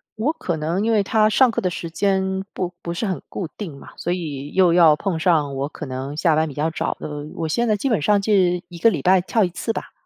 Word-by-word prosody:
我 255 Hz, +9 st, 0 dB
可 175 Hz, -, -3 dB
能 165 Hz, +6 st, -1 dB
因 230 Hz, -, +1 dB
为 210 Hz, -2 st, +3 dB
它 215 Hz, +1 st, +3 dB
上 255 Hz, +2 st, +4 dB
课 -, -, -2 dB
的 185 Hz, -, 0 dB
时 170 Hz, -1 st, -6 dB
间 190 Hz, +1 st, 0 dB
不 180 Hz, -1 st, -3 dB
不 170 Hz, -, -5 dB
是 170 Hz, +6 st, -2 dB
很 190 Hz, -3 st, -2 dB
固 180 Hz, -, -4 dB
定 170 Hz, -10 st, -7 dB
嘛， -, -, -13 dB
所 175 Hz, -, -2 dB
以 145 Hz, -5 st, -4 dB
又 185 Hz, -3 st, +4 dB
要 165 Hz, -4 st, +6 dB
碰 170 Hz, -1 st, -2 dB
上 155 Hz, -6 st, +2 dB
我 140 Hz, +2 st, -2 dB
可 155 Hz, -, -8 dB
能 135 Hz, +3 st, -5 dB
下 165 Hz, -2 st, +3 dB
班 160 Hz, +1 st, +2 dB
比 140 Hz, -, -8 dB
较 155 Hz, +2 st, 0 dB
早 -, -, -2 dB
的， -, -, -5 dB, 0.3 s
我 160 Hz, -, -2 dB
现 235 Hz, +9 st, 0 dB
在 215 Hz, -, +2 dB
基 240 Hz, -, -2 dB
本 225 Hz, -, +1 dB
上 205 Hz, +6 st, +3 dB
是 185 Hz, -4 st, +2 dB
1 170 Hz, -1 st, -10 dB
个 230 Hz, -, +5 dB
礼 190 Hz, -, -3 dB
拜 185 Hz, 0 st, +5 dB
跳 220 Hz, +3 st, +1 dB
1 180 Hz, -, +1 dB
次 225 Hz, +6 st, -3 dB
吧。 -, -, -6 dB
180 Hz, 275 characters per minute, -22 LUFS, 160-205 Hz, 0.3 s, 要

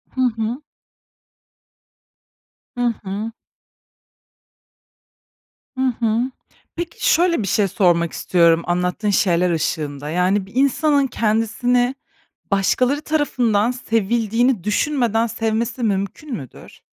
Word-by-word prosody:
Hı 260 Hz, -, -1 dB, 0.2 s
hı. 240 Hz, +6 st, -2 dB, 2.2 s
Hı 245 Hz, -1 st, +1 dB
hı. 205 Hz, +4 st, -4 dB, 2.5 s
Hı 260 Hz, -, -1 dB, 0.2 s
hı. 235 Hz, +3 st, 0 dB, 0.4 s
Peki, 340 Hz, 0 st, 0 dB
şöyle 340 Hz, -5 st, +2 dB
bir -, -, -3 dB
şey 200 Hz, +2 st, +2 dB
sormak 175 Hz, -5 st, +2 dB
istiyorum 170 Hz, -2 st, +3 dB
anlattığın 180 Hz, +4 st, -1 dB
şeyler 180 Hz, -3 st, +2 dB
ışığında. 150 Hz, -3 st, -2 dB
Yani, 185 Hz, +4 st, +1 dB
bir 200 Hz, +5 st, -18 dB
insanın 280 Hz, +1 st, +2 dB
kendisini 245 Hz, +3 st, +1 dB, 0.6 s
başkaları 250 Hz, +8 st, +2 dB
tarafından 245 Hz, -8 st, +1 dB
sevildiğini 230 Hz, -1 st, 0 dB
düşünmeden 230 Hz, +1 st, +1 dB
sevmesi 230 Hz, +2 st, -2 dB
mümkün 200 Hz, +7 st, -2 dB
müdür? 135 Hz, -4 st, -12 dB
225 Hz, 90 wpm, -20 LUFS, 190-250 Hz, 2.5 s, istiyorum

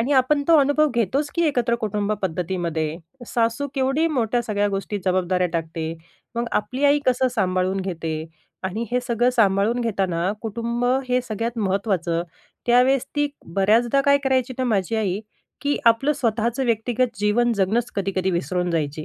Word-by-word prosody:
आणि 260 Hz, +5 st, 0 dB
आपण 280 Hz, +2 st, +3 dB
तो 330 Hz, -, +7 dB
अनुभव 290 Hz, +2 st, +3 dB
घेतोच 265 Hz, +6 st, 0 dB
की 340 Hz, -, +1 dB
एकत्र 240 Hz, -5 st, +1 dB
कुटुंब 210 Hz, -1 st, -1 dB
पद्धतीमध्ये. 165 Hz, -3 st, -2 dB, 0.3 s
सासू 230 Hz, +4 st, 0 dB
केवढी 270 Hz, +4 st, +1 dB
मोठ्या 240 Hz, 0 st, +1 dB
सगळ्या 205 Hz, -2 st, 0 dB
गोष्टी 200 Hz, +1 st, -3 dB
जबाबदाऱ्या 180 Hz, 0 st, +1 dB
टाकते. 165 Hz, -1 st, -3 dB, 0.4 s
मग 235 Hz, -, -1 dB, 0.2 s
आपली 260 Hz, +6 st, -4 dB
आई 285 Hz, +1 st, +5 dB
कसं 255 Hz, 0 st, +3 dB
सांभाळून 185 Hz, -1 st, 0 dB
घेते. 165 Hz, -4 st, -4 dB, 0.4 s
आणि 215 Hz, +5 st, -2 dB
हे 250 Hz, -, +1 dB
सगळं 240 Hz, 0 st, +1 dB
सांभाळून 220 Hz, +1 st, +2 dB
घेताना 190 Hz, -5 st, 0 dB
कुटुंब 235 Hz, +2 st, -2 dB, 0.2 s
हे 250 Hz, 0 st, +2 dB
सगळ्यात 230 Hz, +1 st, -4 dB
महत्त्वाचं. 190 Hz, -4 st, 0 dB, 0.4 s
त्यावेळेस 250 Hz, +2 st, +4 dB
ती 290 Hz, 0 st, +2 dB, 0.3 s
बऱ्याचदा 225 Hz, +7 st, +3 dB
काय 280 Hz, 0 st, +4 dB
करायची 260 Hz, -1 st, +1 dB
ना, 255 Hz, -, 0 dB
माझी 220 Hz, -2 st, 0 dB
आई 200 Hz, -2 st, -1 dB, 0.4 s
की 285 Hz, 0 st, 0 dB
आपलं 230 Hz, +6 st, +4 dB
स्वतःचं 235 Hz, +1 st, 0 dB
व्यक्तिगत 235 Hz, +1 st, 0 dB
जीवन 235 Hz, +3 st, +2 dB
जगणंच 215 Hz, +5 st, 0 dB
कधी-कधी 190 Hz, -1 st, 0 dB
विसरून 175 Hz, +1 st, -1 dB
जायची. 155 Hz, -2 st, -2 dB
225 Hz, 150 wpm, -23 LUFS, 190-250 Hz, 0.4 s, तो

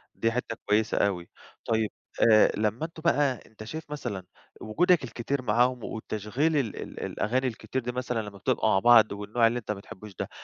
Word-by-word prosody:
دي 115 Hz, -, +1 dB
حتّة 115 Hz, -1 st, -3 dB
كويّسة 105 Hz, +1 st, +2 dB
أوي. 90 Hz, -4 st, 0 dB, 0.4 s
طيّب 110 Hz, -1 st, +1 dB, 0.4 s
آآ 110 Hz, 0 st, +6 dB
لمّا 110 Hz, +7 st, 0 dB
أنتم 165 Hz, 0 st, -10 dB
بقى 145 Hz, -6 st, +2 dB
أنت 110 Hz, -1 st, -12 dB
شايف 155 Hz, +8 st, -7 dB
مثلًا 120 Hz, -10 st, -4 dB, 0.4 s
وجودك 175 Hz, +9 st, +2 dB
الكتير 125 Hz, +3 st, -3 dB
معاهم 125 Hz, +1 st, +2 dB
وتشغيل 110 Hz, +9 st, -2 dB
ال 120 Hz, -8 st, -1 dB
ال -, -, -7 dB
الأغاني 130 Hz, +4 st, 0 dB
الكتير 115 Hz, +1 st, -4 dB
دي 125 Hz, 0 st, -3 dB
مثلًا، 125 Hz, -2 st, -2 dB
لمّا 100 Hz, -, -14 dB
بتبقوا 95 Hz, -, +1 dB
مع 95 Hz, -, +4 dB
بعض 120 Hz, 0 st, +6 dB
والنوع 105 Hz, +3 st, +1 dB
اللي 120 Hz, +2 st, 0 dB
أنت 110 Hz, -, -5 dB
ما 105 Hz, -, -3 dB
بتحبوش 100 Hz, 0 st, -11 dB
ده، -, -, -3 dB
115 Hz, 185 wpm, -27 LUFS, 105-130 Hz, 0.4 s, آآ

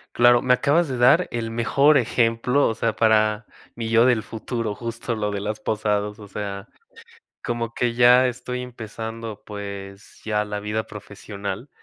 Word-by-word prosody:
Claro, 120 Hz, 0 st, +5 dB
me 125 Hz, -, +3 dB
acabas 150 Hz, +6 st, +2 dB
de 130 Hz, -, -3 dB
dar 125 Hz, +9 st, +5 dB
el 115 Hz, -1 st, -3 dB
mejor 140 Hz, +6 st, +3 dB
ejemplo, 120 Hz, +2 st, +2 dB
o -, -, 0 dB
sea, 115 Hz, 0 st, -1 dB
para 110 Hz, -1 st, +2 dB, 0.3 s
mi 115 Hz, -1 st, -4 dB
yo 115 Hz, +1 st, +5 dB
del 120 Hz, -4 st, +3 dB
futuro, 115 Hz, 0 st, -4 dB
justo 115 Hz, +1 st, -4 dB
lo 105 Hz, -1 st, -2 dB
de 100 Hz, -, -3 dB
las 105 Hz, +1 st, -4 dB
posadas, 105 Hz, -1 st, -1 dB
o 105 Hz, -, -11 dB
sea, 100 Hz, 0 st, -6 dB, 0.8 s
como 115 Hz, -2 st, -3 dB
que 120 Hz, -1 st, 0 dB
ya 125 Hz, +2 st, +6 dB
estoy 125 Hz, 0 st, -4 dB
empezando, 115 Hz, -2 st, -7 dB
pues, 100 Hz, -1 st, -8 dB
ya 105 Hz, -1 st, 0 dB
la 105 Hz, 0 st, -4 dB
vida 105 Hz, +2 st, -2 dB
profesional, 100 Hz, +2 st, -7 dB
115 Hz, 160 wpm, -23 LUFS, 105-120 Hz, 0.8 s, ya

